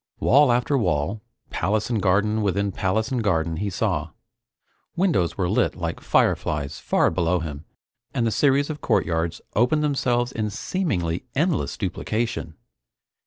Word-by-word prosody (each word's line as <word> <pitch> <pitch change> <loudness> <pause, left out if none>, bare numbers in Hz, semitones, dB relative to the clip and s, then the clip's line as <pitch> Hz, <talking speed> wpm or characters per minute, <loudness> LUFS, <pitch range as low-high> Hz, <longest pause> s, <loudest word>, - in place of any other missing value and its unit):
Wall 140 +1 +5
after 125 +3 +2
wall, 95 +1 0 0.3
palace 110 +3 0
and 110 -3 0
garden 105 +3 +2
within 100 0 0
palace 110 +5 -1
and 125 -3 0
garden, 80 -5 0
he 100 +3 -2
saw. 90 - -1 0.9
Windows 165 - +1
were 90 -3 0
lit - - +1
like - - -4
fireflies 75 -1 0
far - - +2
below 85 +1 +1
him 75 -1 -6 0.5
and 120 -4 0
the 115 - +1
series 140 +4 +2
of 150 - -8
courtyards 85 0 0
opened 125 +7 +3
themselves 125 -4 +1
in 110 -3 -2
seemingly 100 - -2
endless 165 +3 0
duplication. 105 -3 -3
105 Hz, 140 wpm, -24 LUFS, 85-125 Hz, 0.9 s, Wall